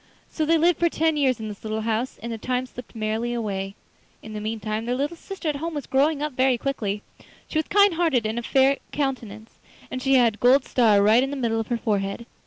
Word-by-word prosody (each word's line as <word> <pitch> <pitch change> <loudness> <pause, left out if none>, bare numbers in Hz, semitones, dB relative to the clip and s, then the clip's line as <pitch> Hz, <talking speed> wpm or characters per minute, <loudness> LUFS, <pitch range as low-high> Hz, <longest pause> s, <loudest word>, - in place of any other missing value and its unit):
So 310 -2 -1
they 330 +1 +4
lived 340 +1 +3
for 340 - +3
ten 320 0 +1
years 265 -5 +1
in 220 - -5
this 210 -2 -9
little 220 0 -2
house, 225 +3 -2
and 235 - -4
the 225 - -5
time 255 +2 -1
slipped 250 -1 -11
merrily 225 +2 -2
away. 195 -4 -3 0.5
In 220 - -9
the 210 - -5
meantime 215 0 -3
their 245 +1 -1
little 285 +6 -2
sister 380 0 -7
at 295 -2 0
home 325 +2 -4
was 290 - -4
growing 285 +2 +1
up 300 -3 -3
quickly. 250 -5 0 0.4
She 310 - -1
was 315 - -2
kind 405 -2 +5
hearted 320 -9 +1
and 220 +2 -1
of 235 - -7
a - - -12
fair 270 0 +4
countenance, 230 -7 -4 0.3
and 255 - -4
she 270 +1 +3
had 240 -4 +5
a - - -14
gold 255 +3 +4
star 215 -5 +4
right 220 +4 +5
in 270 - 0
the 285 - -4
middle 230 -3 0
of 225 - -3
her 240 - -1
forehead. 205 0 -2
245 Hz, 240 wpm, -24 LUFS, 220-285 Hz, 0.5 s, kind